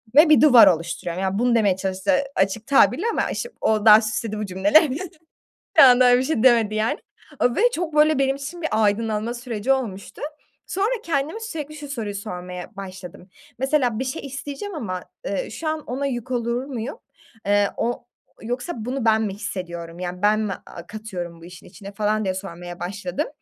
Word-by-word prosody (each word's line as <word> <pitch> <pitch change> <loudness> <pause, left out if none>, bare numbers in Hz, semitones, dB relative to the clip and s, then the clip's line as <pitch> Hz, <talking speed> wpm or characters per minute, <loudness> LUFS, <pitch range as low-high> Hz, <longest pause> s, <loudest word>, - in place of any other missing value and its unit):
ve 305 +2 +8
bir 305 - +6
duvar 260 -6 +8
oluşturuyorum. 170 +1 -1
Yani, 190 +2 -1
bunu 240 -1 +3
demeye 205 -4 +3
çalıştı 190 +7 -1 0.2
açık 195 +3 0
tabirle 280 - +4
ama - - -1
işte 480 - -4
o 215 -1 +1
daha 215 0 +9
süsledi 215 0 -3
bu 215 - -2
cümlelerini. 280 - +3 0.8
Bir - - +10
anda 250 -1 +7
öyle 245 0 +6
bir - - 0
şey 260 -4 0
demedi 230 -4 +4
yani, 215 +1 0 0.5
ııı, 245 -1 +2
ve 405 - +1
çok 330 -5 -3
böyle 305 -1 +4
benim 270 0 +2
için 290 +5 -7
bir 320 - -1
aydınlanma 220 +1 +1
süreci 240 0 -3
olmuştu. 220 -8 -3 0.4
Sonra 395 +4 0
kendime 315 +6 -1
sürekli 305 -9 -6
şu 295 -1 -8
soruyu 220 -7 -4
sormaya 180 -1 -7
başladım. 185 -1 -9 0.3
"Mesela 265 -4 +1
bir - - 0
şey 265 +3 -4
isteyeceğim 280 +8 -6
ama, 185 - -4 0.2
eee, - - -2
şu 330 - -5
an 310 0 -1
ona 270 +3 -2
yük 255 -1 -4
olur 240 +1 -1
muyum? 255 0 -5 0.5
Eee, 205 0 +3
o 240 +1 -2 0.4
yoksa 245 +9 -4
bunu 245 +2 -4
ben 220 0 +4
mi 205 -3 -2
hissediyorum? 175 -4 -6
Yani, 180 +1 -5
ben 210 +1 +3
mi, 210 -2 -1
a 170 0 -11
katıyorum 180 -6 -7
bu - - -11
işin 180 +1 -13
içine" 195 +2 -11
falan 215 +1 0
diye 185 - 0
sormaya 175 -2 -8
başladım. 180 +1 -3
225 Hz, 185 wpm, -23 LUFS, 195-270 Hz, 0.8 s, Bir